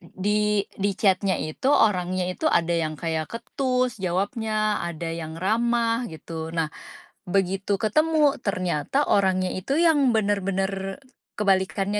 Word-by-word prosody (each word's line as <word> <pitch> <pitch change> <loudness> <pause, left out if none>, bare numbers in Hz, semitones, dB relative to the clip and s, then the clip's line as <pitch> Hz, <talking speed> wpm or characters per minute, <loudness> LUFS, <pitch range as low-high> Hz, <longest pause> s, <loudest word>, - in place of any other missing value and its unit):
di 210 +3 0
di 200 +1 0
chat-nya 195 -1 +2
itu 155 +12 -2
orangnya 185 -7 +2
itu 320 - -8
ada 170 - +2
yang 160 -2 -1
kayak 160 -2 -2
ketus 255 +2 -1
jawabnya, 215 +4 -1
ada 170 -1 -4
yang 165 -1 -5
ramah 230 +3 +1
gitu. 160 +1 -7
Nah, 165 -2 0 0.6
begitu 195 +1 0
ketemu, 305 +5 +3
ternyata 185 - 0
orangnya 185 -2 +2
itu 270 - -1
yang 300 -6 +4
bener-bener, 195 -1 -1 0.4
kebalikannya 195 0 +1
195 Hz, 120 wpm, -24 LUFS, 180-225 Hz, 0.6 s, yang